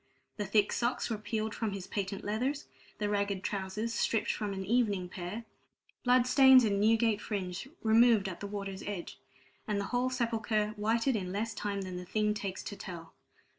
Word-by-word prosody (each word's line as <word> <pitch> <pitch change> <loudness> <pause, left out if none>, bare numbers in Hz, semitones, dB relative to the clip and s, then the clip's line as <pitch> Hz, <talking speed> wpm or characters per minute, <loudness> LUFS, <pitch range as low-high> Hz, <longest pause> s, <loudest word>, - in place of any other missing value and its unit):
The 205 -2 -2
thick 205 +1 +3
socks 245 0 -1
were 220 - 0
peeled 220 0 -2
from 220 -3 -2
his 195 -2 -5
patent 195 -2 -3
leathers, 255 +8 -1 0.3
the 210 - -1
ragged 200 -2 -1
trousers 205 +3 -2
stripped 225 - +1
from 210 -1 -3
an 190 -1 -4
evening 205 -4 +1
pair, 190 +6 -6 0.6
bloodstains 255 +1 +7
and 200 -3 +1
Newgate 225 0 +3
fringe 195 +1 -4 0.2
removed 225 -2 +5
at 185 - -6
the 200 - -5
water's 200 -1 -5
edge, 200 -4 -5 0.5
and 210 -2 0
the 200 - -2
whole 250 +1 +2
sepulchre 225 -4 0
whited 230 +4 +1
in 185 -4 -2
less 215 +3 -2
time 205 -1 -3
than 185 -1 -5
the 180 - -6
thing 210 +3 +1
takes 200 -3 -4
to 205 - -6
tell. 170 -4 -8
210 Hz, 175 wpm, -31 LUFS, 195-230 Hz, 0.6 s, bloodstains